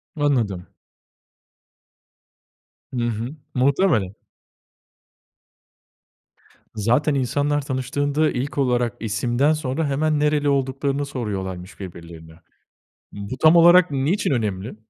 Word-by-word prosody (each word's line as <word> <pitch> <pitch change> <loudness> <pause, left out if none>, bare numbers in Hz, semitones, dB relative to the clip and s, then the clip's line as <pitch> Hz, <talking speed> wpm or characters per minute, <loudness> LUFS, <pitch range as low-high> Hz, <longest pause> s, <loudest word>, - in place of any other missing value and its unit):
Anladım. 120 - 0 2.3
Hı 120 -2 -1
hı. 115 +6 -4 0.2
Muhtemelen. 130 - +1 2.6
Zaten 125 +8 +1
insanlar 145 +3 0
tanıştığında 145 +3 -1
ilk 130 +4 -4
olarak 125 -4 +1
isimden 120 +7 +1
sonra 150 0 -2
hemen 150 +2 0
nereli 150 -1 +1
olduklarını 140 +1 -1
soruyorlarmış 95 -9 -5
birbirlerine. 85 -3 -10 0.8
Bu 100 +5 -6
tam 160 +2 +7
olarak 175 +1 +7
niçin 145 +9 0
önemli? 105 -4 -2
130 Hz, 85 wpm, -22 LUFS, 110-145 Hz, 2.6 s, tam